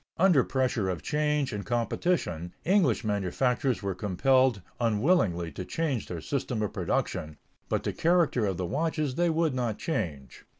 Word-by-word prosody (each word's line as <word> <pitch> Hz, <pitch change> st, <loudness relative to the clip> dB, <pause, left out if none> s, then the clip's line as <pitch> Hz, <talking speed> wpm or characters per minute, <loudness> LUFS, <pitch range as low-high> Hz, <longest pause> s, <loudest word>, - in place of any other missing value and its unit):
Under 170 Hz, -7 st, +5 dB
pressure 125 Hz, -7 st, 0 dB
of 90 Hz, -3 st, -3 dB
change 150 Hz, -3 st, 0 dB
and 105 Hz, -1 st, -3 dB
competition, 115 Hz, -, -1 dB
English 180 Hz, -, +3 dB
manufacturers 110 Hz, +5 st, 0 dB
were 100 Hz, -1 st, -1 dB
compelled 110 Hz, +4 st, +2 dB, 0.2 s
unwillingly 105 Hz, -, +2 dB
to 95 Hz, -, -6 dB
change 140 Hz, -, -2 dB
their 85 Hz, -3 st, -5 dB
system 125 Hz, -, -2 dB
of 105 Hz, -, -3 dB
production, 75 Hz, -1 st, -2 dB, 0.3 s
but -, -, 0 dB
the -, -, -2 dB
character 165 Hz, -, +2 dB
of 95 Hz, -3 st, -2 dB
the 90 Hz, -, -2 dB
watches 155 Hz, -, -1 dB
they 175 Hz, +5 st, +1 dB
would 160 Hz, -2 st, +1 dB
not 120 Hz, -4 st, -1 dB
change. 75 Hz, -, -4 dB
120 Hz, 155 wpm, -28 LUFS, 95-150 Hz, 0.3 s, Under